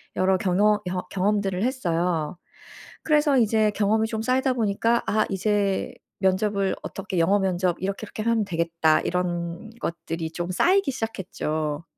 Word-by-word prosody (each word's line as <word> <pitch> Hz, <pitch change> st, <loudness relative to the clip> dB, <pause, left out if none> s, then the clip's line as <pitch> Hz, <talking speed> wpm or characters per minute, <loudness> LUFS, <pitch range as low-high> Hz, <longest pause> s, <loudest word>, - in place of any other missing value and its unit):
여러 185 Hz, 0 st, +3 dB
경허 205 Hz, +3 st, +2 dB
경 180 Hz, 0 st, -2 dB
경험들을 195 Hz, 0 st, 0 dB
했어요. 175 Hz, -, -1 dB, 0.7 s
그래서 295 Hz, -3 st, +3 dB
이제 220 Hz, -1 st, +3 dB
경험이 220 Hz, +2 st, +1 dB
좀 220 Hz, -1 st, -3 dB
쌓이다 260 Hz, +2 st, +2 dB
보니까 230 Hz, +1 st, +1 dB
'아. 215 Hz, 0 st, +2 dB
이제 200 Hz, 0 st, 0 dB, 0.3 s
면접을 195 Hz, +1 st, +1 dB
어떻게 190 Hz, -2 st, -4 dB
영어 195 Hz, +5 st, +3 dB
면접 185 Hz, -2 st, 0 dB
이렇게 195 Hz, +3 st, -3 dB
이렇게 215 Hz, -, -6 dB
하면 230 Hz, -2 st, +1 dB
되겠다.' 165 Hz, -2 st, +1 dB
이런 175 Hz, +2 st, -2 dB
것들이 165 Hz, -1 st, -4 dB
좀 175 Hz, +1 st, -4 dB
쌓이기 370 Hz, -, +3 dB
시작했죠. 160 Hz, -, -3 dB
195 Hz, 320 characters per minute, -25 LUFS, 175-220 Hz, 0.7 s, 여러